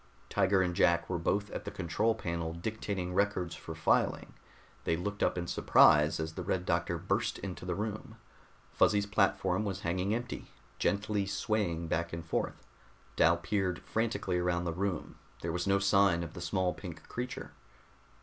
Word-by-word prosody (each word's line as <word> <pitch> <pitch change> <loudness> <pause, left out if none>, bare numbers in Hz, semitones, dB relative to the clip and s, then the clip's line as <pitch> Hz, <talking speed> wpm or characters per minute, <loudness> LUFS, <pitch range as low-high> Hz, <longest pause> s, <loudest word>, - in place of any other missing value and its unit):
_" - - -30
Tiger 95 -1 +3
and 90 -1 -1
Jack 85 -2 +3
were 90 - 0
both 100 +4 0
at - - -5
the - - -4
control 105 +5 0
panel 85 -5 -3
dictating 95 -1 -3
records 95 -3 +1
for - - -8
filing. - - +1 0.5
They 80 - +1
looked 100 +4 -4
up - - +2
in 85 - -2
surprise 75 -2 +5
as 80 0 -3
the 90 - -5
Red 90 0 -1
Doctor 85 0 0
burst 100 +7 -1
into 90 -2 -6
the 90 - -1
room. 105 +1 -4 0.6
Fuzzy's 105 -1 +3
platform 100 -1 +1
was 100 -2 -3
hanging 95 +4 0
empty, 120 +1 -5 0.3
gently 105 -1 0
swaying 100 -4 -1
back 85 +1 -1
and 85 -1 -5
forth. 80 - -2 0.5
Dal 85 +1 +5
peered 90 0 -1
frantically 100 -5 -1
around 90 0 0
the 85 -2 -2
room. 95 -1 -3 0.3
There 85 - -1
was 90 +1 -2
no 100 0 +4
sign 100 -3 +3
of 80 - -7
the 85 - -8
small 90 0 0
pink - - -9
creature. 125 +1 -5
95 Hz, 170 wpm, -32 LUFS, 85-100 Hz, 0.6 s, surprise